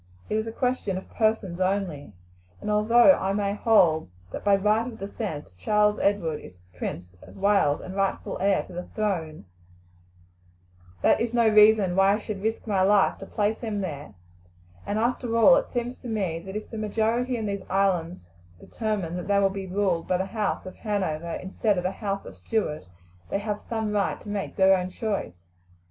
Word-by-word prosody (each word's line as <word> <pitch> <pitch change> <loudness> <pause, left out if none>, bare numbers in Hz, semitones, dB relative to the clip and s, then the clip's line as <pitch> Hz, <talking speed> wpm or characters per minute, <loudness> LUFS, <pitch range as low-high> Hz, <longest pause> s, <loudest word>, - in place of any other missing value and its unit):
It - - +1
is 220 +1 -1
a - - -3
question 245 -5 -1
of 190 - -8
persons 215 -5 0
only, 185 - -1 0.5
and 210 - -3
although 230 +5 +6
I 195 -8 +1
may 200 0 0
hold 180 - +3 0.2
that - - -6
by 200 -1 +5
right 210 +4 +2
of 235 -3 -8
descent 195 - -6
Charles 210 - +2
Edward 175 -7 0
is 90 - -13 0.2
Prince 90 +1 -6
of - - -14
Wales 195 -7 +2
and 185 - -8
rightful 195 -1 -1
heir 195 0 +2
to - - -13
the 180 +1 -6
throne 215 -2 +1
of 160 - -8
England, 155 -8 -13 1.6
that - - +4
is 235 0 -1
no 235 -1 +4
reason 210 -3 +5
why 195 +1 +5
I - - +1
should 215 -2 -6
risk 220 +2 -2
my 200 -4 +1
life 200 +1 +3
to 195 - -9
place 210 +1 -1
him 215 -4 -3
there; 145 - -6 0.7
and 205 - -1
after 235 0 0
all 245 +4 +7
it - - -2
seems 245 0 -3
to - - -9
me 195 -8 -2
that 190 - -7
if 215 - -6
the 225 - -5
majority 225 +4 0
in 220 - -3
these 200 -1 -3
islands 180 - 0 0.3
determine 210 -7 -3
that 180 - -6
they 200 0 +3
will 195 -1 +3
be 195 -1 -5
ruled 185 -3 0
by 180 - +2
the 190 - -1
house 210 0 -2
of 185 - -9
Hanover 170 -6 -2
instead 195 +2 -1
of 180 - -1
the 185 - 0
house 195 0 -4
of - - -9
Stuart 150 - -2 0.4
they - - 0
have 210 0 -3
some 220 -2 -3
right 205 -2 0
to - - -9
make 205 -1 -4
their 190 0 +5
own 180 -1 -2
choice." 200 - -3
200 Hz, 195 wpm, -26 LUFS, 185-215 Hz, 1.6 s, all